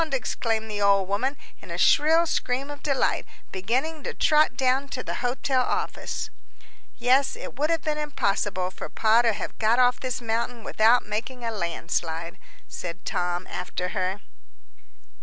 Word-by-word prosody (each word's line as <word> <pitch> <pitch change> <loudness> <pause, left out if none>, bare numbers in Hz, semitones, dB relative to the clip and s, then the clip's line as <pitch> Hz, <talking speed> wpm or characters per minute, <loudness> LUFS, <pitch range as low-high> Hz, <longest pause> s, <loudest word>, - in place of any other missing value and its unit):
exclaimed 225 -4 -1
the 210 -1 -3
old 200 -1 +4
woman, 255 +8 0 0.2
in - - -12
a - - -4
shrill 320 +3 +5
scream 275 -2 -1
of 290 - -9
delight, 275 -3 +1 0.3
beginning 260 +12 -1
to - - -5
trot 305 0 +3
down 265 +1 +2
to 255 -2 -5
the - - -4
hotel 255 +1 +1
office. - - -2 0.7
"Yes, 255 +2 +3
it - - -8
would 300 +2 +2
have 330 -2 +1
been 300 -1 -1
impossible 200 -10 -1
for - - -7
Pa 225 +1 +4
to 235 -1 +3
have - - -5
got 225 +2 +3
off 250 0 +4
this 255 -2 -2
mountain 230 0 -2
without 225 +4 +4
making 230 +4 -4
a 230 - -1
landslide," 170 -3 -3 0.3
said 180 0 -7
Tom, 180 0 -1
after 180 0 -4
her. 190 +1 -2
235 Hz, 160 wpm, -26 LUFS, 200-270 Hz, 0.7 s, shrill